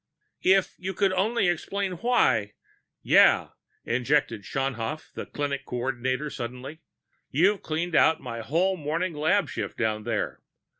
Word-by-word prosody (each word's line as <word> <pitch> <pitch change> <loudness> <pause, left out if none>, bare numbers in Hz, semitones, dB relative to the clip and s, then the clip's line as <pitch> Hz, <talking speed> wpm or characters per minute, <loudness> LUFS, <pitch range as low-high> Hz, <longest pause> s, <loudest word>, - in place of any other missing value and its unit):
"If 190 0 +3
you 190 +1 -4
could 195 0 +2
only 200 +2 +1
explain 190 +3 -1
why 180 - +2 0.2
" - - -48
"Yeah," - - +6 0.4
interjected 125 -2 +1
Schaunhaft, 135 +4 -3
the - - -6
clinic 140 -1 -3
coordinator 130 +3 -2
suddenly. 125 +6 -7 0.5
"You 190 +8 +3
cleaned 165 +2 -3
out 160 0 +4
my 115 - -6
whole 175 +11 +1
morning 165 +3 -2
lab 155 +4 +2
shift - - -5
down 110 -2 -1
there. 115 -2 -2
150 Hz, 135 wpm, -26 LUFS, 125-185 Hz, 0.5 s, Yeah